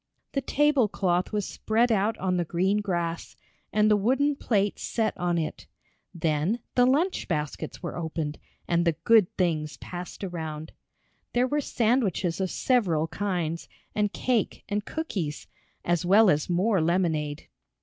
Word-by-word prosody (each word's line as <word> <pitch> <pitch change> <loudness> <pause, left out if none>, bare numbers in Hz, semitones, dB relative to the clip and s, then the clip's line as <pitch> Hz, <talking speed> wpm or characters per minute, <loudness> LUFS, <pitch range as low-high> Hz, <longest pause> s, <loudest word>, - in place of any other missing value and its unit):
The 275 - -1
table 290 -4 +3
cloth 180 -3 0
was 210 -3 -1
spread 230 +2 +1
out 215 +1 +1
on 185 -1 0
the 175 - +1
green 185 +5 +1
grass, 175 -4 -3 0.4
and 210 0 +3
the 210 - +5
wooden 270 +8 +2
plates 205 -6 0
set 225 -2 -1
on 175 -1 0
it. 160 -2 -4 0.4
Then 165 +6 0
the 245 0 +4
lunch 315 +9 +1
baskets 150 +1 -3
were 170 - -4
opened 160 -3 -3 0.3
and 170 0 +2
the 170 -1 +2
good 220 -4 +5
things 155 -6 0
passed 175 +6 -8
around. 160 -4 -5 0.6
There 245 +1 +3
were 295 +3 0
sandwiches 215 - +1
of 190 - 0
several 175 -13 +1
kinds, 175 -5 -2 0.2
and 210 -1 +1
cake 245 -2 -1
and 205 0 -1
cookies, 190 - -4 0.4
as 175 0 +1
well 195 +3 +6
as 150 +3 0
more 185 +2 +2
lemonade. 160 -3 0
185 Hz, 150 wpm, -27 LUFS, 170-220 Hz, 0.6 s, well